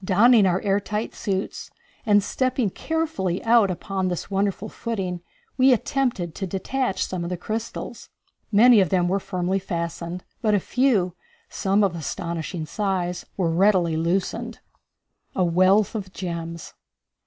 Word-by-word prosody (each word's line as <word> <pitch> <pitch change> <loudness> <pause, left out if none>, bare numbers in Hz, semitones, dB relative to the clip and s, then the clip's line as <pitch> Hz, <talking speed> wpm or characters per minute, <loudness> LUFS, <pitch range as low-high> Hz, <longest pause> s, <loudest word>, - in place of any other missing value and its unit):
Donning 210 +3 +5
our 180 0 +2
air 200 -1 +2
tight 210 +2 -4
suits 195 -2 -3 0.4
and 205 -1 +5
stepping 255 -4 0
carefully 305 - -2
out 230 -3 +5
upon 190 +1 -2
this 180 +2 -4
wonderful 200 +1 0
footing 195 -7 -4 0.4
we 260 +1 +6
attempted 245 - -1
to 190 - -4
detach 195 +5 -1
some 180 -2 -4
of 170 - -4
the 180 - -3
crystals. 220 +5 -5 0.4
Many 225 +2 +7
of 185 -4 +3
them 180 -2 +2
were 195 +3 +1
firmly 190 0 -1
fastened, 170 -1 -4 0.2
but 215 -2 +3
a - - +3
few 215 -6 +1 0.4
some 200 +2 +1
of 190 -4 +1
astonishing 170 +1 -4
size 180 -1 -2
were 175 -4 +1
readily 180 -2 +3
loosened. 170 +4 -1 0.8
A 185 - +2
Wealth 185 +4 +3
of 200 -4 -5
Gems. 170 -3 -6
190 Hz, 145 wpm, -24 LUFS, 175-215 Hz, 0.8 s, Many